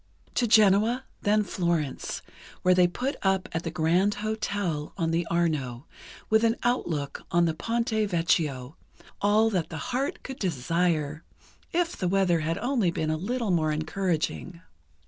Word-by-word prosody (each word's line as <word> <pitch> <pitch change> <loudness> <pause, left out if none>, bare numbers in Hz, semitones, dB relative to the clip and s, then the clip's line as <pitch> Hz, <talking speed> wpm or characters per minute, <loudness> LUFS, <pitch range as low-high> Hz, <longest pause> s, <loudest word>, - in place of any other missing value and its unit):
To 240 - +1
Genoa, 215 +3 +4 0.2
then 210 +1 +3
Florence, 170 -6 -2 0.4
where 185 - +5
they 180 -1 +5
put 255 +10 -3
up 190 -1 +1
at 165 - -2
the 170 - -4
Grand 175 +5 +2
Hotel 205 -7 -2
on 165 -3 0
the 165 +1 0
Arno, 150 -7 -1 0.4
with 220 +1 +3
an 230 0 +3
outlook 160 - -1
on 170 0 +3
the 165 - +1
Ponte 230 +8 -1 0.2
Vecchio, 155 -6 0 0.4
all 215 +2 +4
that 180 -5 -1
the 160 - -6 0.2
heart 270 +3 -2
could 265 - -7
desire, 165 -1 0 0.5
if 345 0 0
the 185 - -2
weather 180 -2 +2
had 160 +2 -1
only 240 -5 +1
been 160 -2 -1
a - - +1
little 225 +5 -2
more 155 -3 +2
encouraging. 170 +2 -2
180 Hz, 150 wpm, -27 LUFS, 160-215 Hz, 0.5 s, where